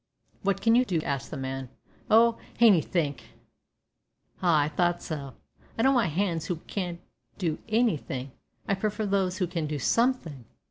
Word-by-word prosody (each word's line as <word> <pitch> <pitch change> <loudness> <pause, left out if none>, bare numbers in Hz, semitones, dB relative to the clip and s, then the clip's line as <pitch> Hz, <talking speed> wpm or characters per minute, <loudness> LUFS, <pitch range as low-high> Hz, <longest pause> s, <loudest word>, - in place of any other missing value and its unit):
"What 195 0 0
can 225 - +5
you 245 +2 +5
do?" 180 -9 -1
asked 140 -3 -3
the - - -6
man. 135 -1 -4 0.4
"Oh! 230 +1 +5 0.2
hanythink." 170 - +3 1.2
"Ah, 170 -5 +4
I 145 - +1
thought 175 +3 0
so; 140 -5 -5 0.4
I 225 - +1
don't 270 +1 +5
want 220 - +2
hands 165 -3 -1
who 180 - -1
can 180 -4 -3 0.4
do 170 -6 -1
anything, 155 - 0 0.4
I - - +2
prefer 210 +2 -1
those 190 -2 0
who 185 - +1
can 170 -3 -3
do 150 0 -3
something." 170 - 0
180 Hz, 155 wpm, -27 LUFS, 150-210 Hz, 1.2 s, can